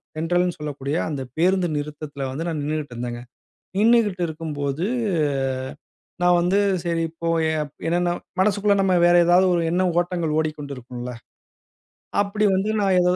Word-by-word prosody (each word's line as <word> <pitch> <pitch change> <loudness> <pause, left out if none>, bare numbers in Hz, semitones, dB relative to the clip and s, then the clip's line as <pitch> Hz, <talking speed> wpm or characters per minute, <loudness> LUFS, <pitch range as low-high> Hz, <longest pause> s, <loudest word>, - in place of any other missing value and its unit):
சென்ட்ரல்னு 175 +2 0
சொல்லக்கூடிய 145 -1 -4
அந்த 140 -3 -3 0.2
பேருந்து 180 +1 +3
நிறுத்தத்தில 145 -2 -5
வந்து 160 +6 -4
நான் 160 -3 -2
நின்னுட்டு 150 -3 -3
இருந்தேங்க. 120 0 -4 0.6
நின்னுக்கிட்டு 210 -4 +3
இருக்கும்போது, 155 -1 -3 1.4
நான் 175 0 +5
வந்து 180 +3 +2 0.3
சரி, 165 -1 0 0.2
போய 165 -1 +1 0.4
என்னன்னா, 175 +1 +1 0.3
மனசுக்குள்ள 205 +1 +3
நம்ம 185 -2 +3
வேற 175 - +5
ஏதாவது 180 +2 +5
ஒரு 170 - +1
எண்ண 180 +2 +1 0.2
ஓட்டங்கள் 170 -3 -1
ஓடிக்கொண்டு 150 -3 -4
இருக்கும்ல? 125 0 -7 1.1
அப்டி 210 +1 -1
வந்து 195 +3 0
நான் 195 -2 +3
ஏதோ 180 0 +3
165 Hz, 130 wpm, -23 LUFS, 150-180 Hz, 1.4 s, நான்